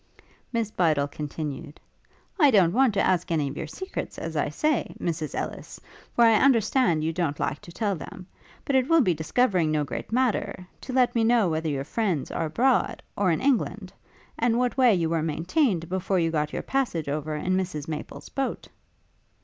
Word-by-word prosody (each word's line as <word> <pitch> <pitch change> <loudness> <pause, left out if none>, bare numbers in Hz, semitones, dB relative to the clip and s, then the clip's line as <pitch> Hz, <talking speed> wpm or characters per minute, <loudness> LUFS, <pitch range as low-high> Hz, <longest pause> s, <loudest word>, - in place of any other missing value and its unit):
Miss 230 -3 -1
Bydel 155 -7 +2
continued: 145 0 -6 0.6
'I 295 -4 +7
don't 190 -8 +4
want 255 -4 +3
to - - +2
ask 180 -2 +1
any 155 -4 +1
of 135 - -7
your 155 - -5
secrets, 375 - -6
as - - -5
I - - 0
say, 305 -1 -1
Mrs 160 -3 -3
Elless, - - -5 0.4
for 235 - +5
I 225 -2 +6
understand 230 - +3
you 160 +1 -1
don't 160 -4 -2
like 150 - -1
to 170 - -12
tell 205 +1 -1
them; 185 +2 -9 0.4
but 280 - 0
it 260 0 +2
will 330 -1 +6
be 185 -9 +3
discovering 170 +2 +1
no 155 -1 +1
great 145 - -6
matter, 235 -6 0 0.2
to - - -4
let 255 -1 +3
me 230 - +2
know 225 -4 +3
whether 160 0 -1
your 135 -2 -2
friends 185 - -1
are 165 - -1
abroad, 245 - +1
or 200 -2 +1
in 165 - +1
England? 215 -8 0 0.5
and 235 0 +2
what 250 0 0
way 255 -3 +5
you 170 -2 0
were 165 0 0
maintained 170 - 0
before 190 +1 -1
you 165 -2 +1
got 150 -1 -1
your - - -4
passage 245 - -1
over 150 +1 -2
in 180 +5 -1
Mrs 180 -6 -3
Maple's 155 -1 -7
boat.' 275 -1 -3
185 Hz, 190 wpm, -26 LUFS, 155-240 Hz, 0.6 s, I